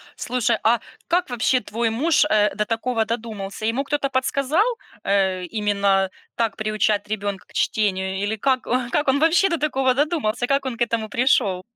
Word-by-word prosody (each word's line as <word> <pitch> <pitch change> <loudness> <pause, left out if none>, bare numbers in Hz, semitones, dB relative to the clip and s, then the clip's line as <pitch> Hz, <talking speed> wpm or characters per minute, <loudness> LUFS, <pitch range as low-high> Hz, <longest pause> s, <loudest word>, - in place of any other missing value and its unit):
Слушай, 240 -2 0
а 230 +1 +4 0.3
как 350 -3 +1
вообще 245 +1 +1
твой 225 +2 -1
муж, 290 +8 +2
э, 210 -1 +3
до 210 0 0
такого 225 0 -1
додумался? 220 -3 -5
Ему 235 +5 0
кто-то 280 -1 -1
подсказал, 275 +6 +1 0.4
э, 190 -2 +1
именно 200 -2 +1 0.3
так 230 -3 0
приучать 215 -1 0
ребёнка 200 -2 -3
к - - -22
чтению 190 -3 0
или 215 +2 -1
как 260 +3 +1 0.3
как 295 - 0
он 265 +1 +3
вообще 335 +5 +4
до 335 - 0
такого 270 -3 +1
додумался, 265 -5 0
как 275 0 +1
он 250 -3 -3
к 240 - -14
этому 230 -2 -2
пришёл? 220 -6 +2
230 Hz, 170 wpm, -22 LUFS, 210-265 Hz, 0.4 s, а